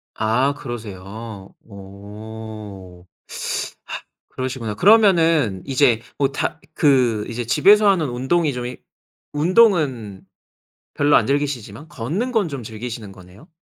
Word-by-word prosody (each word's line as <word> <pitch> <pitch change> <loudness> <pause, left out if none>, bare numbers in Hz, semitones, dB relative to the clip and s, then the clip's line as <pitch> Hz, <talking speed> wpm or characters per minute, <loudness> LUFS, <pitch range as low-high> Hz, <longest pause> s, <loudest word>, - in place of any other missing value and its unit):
아 120 +6 +1
그러세요. 105 -3 -8
어. 100 -2 -10 1.2
그러시구나. 130 -4 -4
그러면은 165 - +4
이제 130 -4 +3 0.2
뭐 140 -1 +1
다 135 - -3
그 125 -9 +2
이제 120 +1 -4
집에서 205 - +5
하는 170 -7 +2
운동이 135 +5 0
좀 125 -1 -4
이 125 +1 -6 0.6
운동은 150 - +2 0.7
별로 145 0 +4
안 110 - +3
즐기시지만 140 -2 -2
걷는 155 - -3
건 215 -7 +1
좀 140 -5 -6
즐기시는 110 -1 -7
거네요? 95 - -16
120 Hz, 240 characters per minute, -21 LUFS, 105-145 Hz, 1.2 s, 집에서